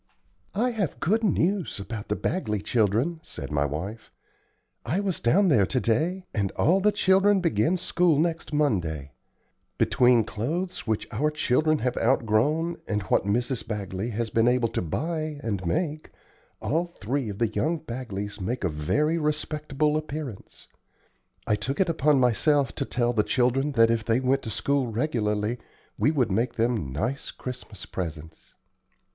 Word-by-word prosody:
"I 245 +5 +2
have 200 - -2
good 220 +7 +1
news 185 - +1
about 105 +1 -6
the 105 - 0
Bagley 105 - -1
children," 115 - +1
said 70 - -8
my 75 0 +1
wife. 90 +10 -5 0.7
"I 150 +11 -1
was 195 -4 -1
down 185 +11 +3
there 105 - +4
to 130 - 0
day, 165 +12 0
and 100 -5 0
all 180 +5 +3
the 210 +2 +4
children 195 +1 +4
begin 170 - +2
school 175 -3 +2
next 165 +1 -1
Monday. 85 - 0 0.7
Between 125 -2 +4
clothes 160 - -3
which 110 -1 -1
our 150 +2 +1
children 150 +1 +2
have 125 - 0
outgrown, 135 +8 +2
and 105 -1 -1
what 95 - +1
Mrs. 120 +4 -1
Bagley 100 0 -3
has 115 0 -3
been 115 +1 +3
able 125 -1 +3
to 115 - -2
buy 155 - -3
and 100 -5 -2
make, 155 - -1 0.5
all 165 +4 0
three 130 -4 -3
of 100 - -6
the 115 0 +1
young 160 +9 0
Bagleys 110 -8 -6
make 115 +6 -2
a 95 - +2
very 150 - 0
respectable 150 -1 0
appearance. 150 -8 -7 0.8
I 105 - +2
took 135 +6 -3
it 190 -2 +3
upon 150 -3 +3
myself 130 +2 +2
to - - -3
tell 120 -1 0
the 110 - +3
children 130 +5 +1
that 115 -2 +5
if 115 -2 0
they 115 +2 +2
went 130 +1 +1
to - - -6
school 140 +4 0
regularly 110 -2 -1 0.4
we - - +4
would 130 -9 +1
make 115 +6 0
them 115 - 0
nice 115 - -2
Christmas 120 -6 -8
presents." 80 -4 -7
125 Hz, 160 wpm, -26 LUFS, 105-155 Hz, 0.8 s, that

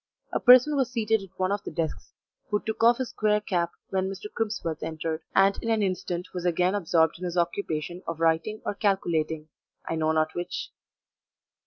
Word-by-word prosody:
A - - +1
person 255 +4 +7
was 265 -3 +1
seated 225 -3 +1
at 195 - -10
one 185 0 0
of 200 0 -1
the - - -5
desks, 165 -2 -4 0.3
who 210 - +1
took 220 +1 -3
off 235 +1 +6
his 260 -2 -3
square 210 0 +1
cap 175 -5 -1 0.2
when 190 0 0
Mr. 195 +2 -7
Crimsworth 205 -8 -2
entered, 160 0 -3
and 195 +1 +4
in 230 - -3
an 220 -2 +2
instant 180 -2 -2
was 180 -2 -4
again 180 +1 +2
absorbed 165 -5 +2
in - - -8
his 175 0 -3
occupation 175 -1 -1
of 165 -1 -4
writing 165 +6 +1
or - - -1
calculating 160 -6 0 0.4
I - - -1
know 160 -1 +1
not 155 0 +1
which. 175 0 -4
185 Hz, 190 wpm, -27 LUFS, 165-210 Hz, 0.4 s, person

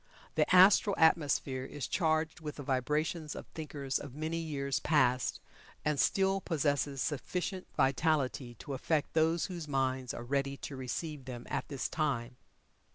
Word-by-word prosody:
The - - +2
astral 190 +2 +7
atmosphere 145 -5 +3
is 135 0 -5
charged 160 -2 0
with 150 -2 -6
the 145 - -7
vibrations 150 +4 -1
of - - -7
thinkers 140 -4 -3
of 140 -3 -9
many 160 +2 -2
years 140 -4 -2
past, 130 -5 +2 0.5
and 150 -2 +1
still 195 0 +2
possesses 145 -4 0
sufficient 180 +5 -3
vitality 135 -3 +1
to 140 - -7
affect 150 +3 0
those 160 0 +2
whose 175 -4 -6
minds 130 -2 0
are 120 - -6
ready 140 +2 -1
to 140 - -7
receive 135 +2 -4
them 120 -2 -7
at - - -2
this 140 -3 -3
time. 130 -6 -2
145 Hz, 150 wpm, -32 LUFS, 135-160 Hz, 0.5 s, astral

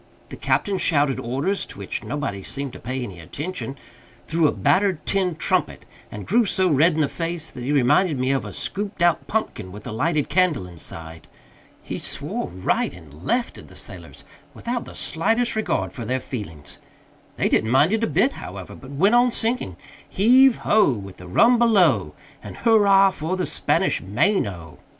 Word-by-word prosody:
The - - -7
captain 195 -2 0
shouted 145 -4 +2
orders 140 +12 -1
(to - - -11
which 100 -1 -5
nobody 140 -10 -4
seemed 135 +6 -5
to - - -10
pay 130 +2 -4
any 95 -7 -8
attention) 140 - -6 0.5
through 160 -1 +2
a - - +2
battered 190 -4 +1
tin 185 -3 0
trumpet, 155 - -1 0.3
and 105 - -7
grew 235 +5 +3
so 190 -2 +2
red 155 +4 +4
in 160 - +1
the 145 - +2
face 165 +1 -4
that 125 - -8
he 135 - -2
reminded 145 +4 +3
me 130 +1 0
of 135 - 0
a - - -7
scooped 200 -3 -3
out 175 -1 +2
pumpkin 215 - -3
with 105 +2 -11
a - - -5
lighted 150 +6 0
candle 170 - +1
inside. 80 -2 -7 0.6
He - - -5
swore - - -2
right 90 +1 -1
and 80 -3 -14
left 240 - -1
at - - -13
the - - -16
sailors - - -9 0.3
without 240 0 -4
the - - -11
slightest 225 +9 +1
regard 215 -6 -1
for 120 - -6
their 130 +3 -1
feelings. 100 - -8 0.6
They - - +1
didn't 110 - +1
mind 145 - +4
it 225 0 0
a - - +2
bit, 265 - +2
however, 95 - -9
but 130 - -12
went 180 +10 +2
on 245 +1 +5
singing 225 - -2 0.3
"Heave 250 +5 +5
ho! 210 -10 +4
With 100 -4 -8
the 90 - -11
rum 230 - +4
below, 165 - +3 0.3
And - - -9
hurrah 200 -4 +5
for 180 +1 -3
the 185 - -1
Spanish - - +1
Main 120 - +1
O!" 85 -5 -9
155 Hz, 185 wpm, -23 LUFS, -, 0.6 s, on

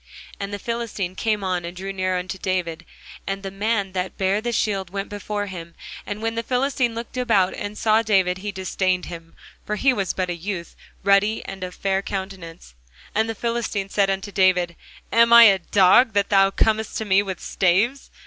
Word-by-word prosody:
And 200 0 -4
the 205 - -3
Philistine 225 -4 -3
came 215 0 -1
on 180 -2 -1
and 175 +1 -7
drew 195 +1 -5
near 185 -1 -1
unto 185 +1 -5
David; 170 -3 -2 0.4
and 195 0 -3
the 195 - -5
man 200 0 -1
that 185 0 -4
bare 195 +2 +1
the 240 +1 -2
shield 195 -5 -1
went 195 +2 -4
before 205 0 -4
him. 170 -4 -8 0.3
And 210 +2 -5
when 225 0 0
the 230 - -2
Philistine 250 -1 0
looked 230 +2 -7
about, 215 -7 +2
and 205 +1 -6
saw 220 0 +3
David, 190 -4 +2
he 205 +2 -4
disdained 185 -1 -1
him: 165 -1 -10 0.3
for 210 - -3
he 265 +5 +3
was 195 -6 -1
but 185 -1 -2
a - - -3
youth, 170 0 -6 0.3
and - - -28
ruddy, 200 +2 +3
and 195 -1 -7
of 180 0 -6
a - - -22
fair 195 0 0
countenance. 190 - -7 0.4
And 220 +1 +1
the 225 - -3
Philistine 230 -3 -2
said 195 0 +2
unto 195 +1 -2
David, 180 -3 +2 0.4
Am 230 0 +5
I 235 0 +10
a 200 -4 +7
dog, 200 +6 +4
that 200 0 +1
thou 195 -1 +5
comest 220 +2 0
to 220 - -3
me 195 -1 +4
with 190 -3 -5
staves? 205 +9 +1
195 Hz, 205 wpm, -23 LUFS, 185-220 Hz, 0.4 s, I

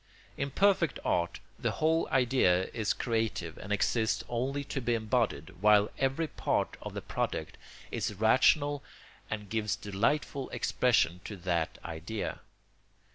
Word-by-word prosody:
In 140 - -2
perfect 185 0 +3
art 85 0 0 0.2
the - - 0
whole 160 +1 +2
idea 120 -8 +3
is 110 -3 0
creative 110 -8 -1
and 95 - -8
exists 110 +1 +1
only 130 +4 -1
to 135 0 -4
be 120 0 +1
embodied, 110 - 0
while 105 0 +5
every 135 +5 +1
part - - -1
of - - -7
the - - -4
product - - -3 0.4
is 105 - -2
rational 140 +7 +3 0.5
and 105 -1 -4
gives 105 -2 -1
delightful 130 +7 -1
expression 90 -8 +2
to 105 - -5
that 85 -3 -1
idea. 85 +6 -4
110 Hz, 130 wpm, -31 LUFS, 100-135 Hz, 0.5 s, while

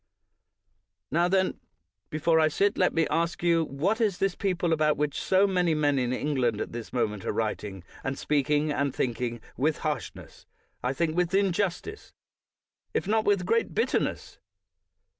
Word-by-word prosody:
Now, 170 +4 +3
then, 190 0 +1 0.5
before 160 +1 +2
I 155 - +5
sit 200 +6 +2
down, - - -8
let 185 - +3
me 165 -1 +3
ask 165 +2 0
you 170 -1 +3
what 175 - -1
is 205 -5 +1
this 195 -1 +1
people, 180 -4 0
about 155 -1 +2
which 150 -1 -1
so 190 +1 +4
many 180 -4 +2
men 145 -2 +2
in 125 -1 0
England 130 -5 0
at - - -4
this 120 -1 -7
moment 105 -5 -1
are - - -1
writing, 105 -3 -3 0.2
and 135 0 -2
speaking, 150 +1 +1
and 140 -2 -1
thinking, 120 -1 -2 0.2
with 150 +5 +1
harshness, 150 -6 -5 0.4
I 125 - +1
think 160 +2 -1
with 180 +1 +1
injustice, 195 - -1 0.8
if - - 0
not 220 +1 +2
with 200 -3 +2
great 230 +4 0
bitterness? - - -1
155 Hz, 160 wpm, -27 LUFS, 135-180 Hz, 0.8 s, I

